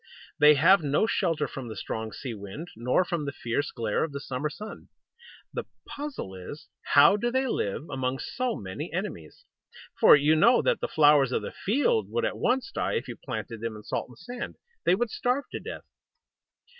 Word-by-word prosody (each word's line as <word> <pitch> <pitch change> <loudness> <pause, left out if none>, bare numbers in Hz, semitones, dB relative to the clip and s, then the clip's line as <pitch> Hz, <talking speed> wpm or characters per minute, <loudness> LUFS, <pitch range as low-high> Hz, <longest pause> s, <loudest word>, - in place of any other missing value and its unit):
They 150 0 +8
have 170 +6 +6
no 145 +6 +2
shelter 180 -7 0
from 135 -3 -7
the 110 - -6
strong 110 0 -4
sea 125 0 -6
wind, 105 - -8
nor 125 +10 +1
from 170 -4 -2
the 140 - -2
fierce 130 +2 -2
glare 115 -3 -1
of 160 -3 -4
the 140 - -4
summer 140 +2 -3
sun. 215 +7 -9 0.7
The - - -3 0.2
puzzle 285 - -6
is, 95 +11 -9
how 150 +8 +6
do 240 +3 0
they 260 +2 +1
live 145 - -2
among 130 -1 -2
so 250 - -2
many 105 - -6
enemies? 175 - -6 0.5
For - - +9
you 150 +2 +4
know 240 +10 +5
that - - +2
the - - -2
flowers 145 -4 +5
of - - 0
the - - -5
field 290 - +1
would 470 +1 0
at - - -3
once 265 +9 +1
die - - -1
if 465 - -2
you - - -6
planted 115 -3 -6
them 115 -1 -3
in 105 - -10
salt - - -3
and 125 - -15
sand. 245 +6 -7 0.3
They - - +5
would 230 +2 -1
starve 260 +2 0
to - - -4
death. - - -8
150 Hz, 195 wpm, -27 LUFS, -, 0.7 s, For